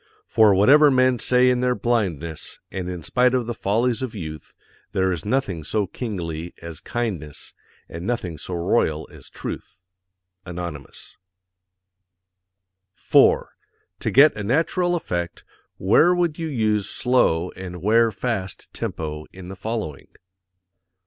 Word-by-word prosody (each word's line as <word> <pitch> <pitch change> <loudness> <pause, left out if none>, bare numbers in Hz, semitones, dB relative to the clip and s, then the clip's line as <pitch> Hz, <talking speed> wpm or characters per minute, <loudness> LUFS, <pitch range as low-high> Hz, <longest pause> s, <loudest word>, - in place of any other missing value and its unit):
For 110 -3 +5
whatever 145 +10 +6
men 130 -2 +3
say 125 +1 +4
in 125 - +1
their_ 125 0 0
BLINDNESS, 90 -10 -2
and 90 -1 -4
in 90 -3 -6
spite 125 +5 +2
of 125 -2 0
the 120 - -3
FOLLIES 115 +4 0
of 125 -4 -4
YOUTH, 80 -6 -8 0.4
there 95 0 +2
is 85 -4 -4
nothing 105 -9 -1
so 105 +6 0
KINGLY 90 -6 -5
as 85 -1 -8
KINDNESS, 95 - -4 0.3
and 85 +1 -8
nothing 90 -10 -3
so 90 - -5
ROYAL 85 -3 0
as - - -14
TRUTH. - - -7 0.6
Anonymous. 85 -5 -8 1.8
4. - - +4 0.5
To - - -1
get 145 +3 +6
a 105 - -5
natural 165 - +1
effect, 85 - -4 0.3
where 160 - +4
would 175 -2 0
you 165 - -2
use 110 -7 0
slow 90 -9 +1
and 90 -1 -8
where 115 +2 +4
fast 100 -3 -4
tempo 75 -1 -4
in 95 -1 -10
the 95 - -7
following? 100 -7 -5
105 Hz, 135 wpm, -23 LUFS, 85-125 Hz, 1.8 s, whatever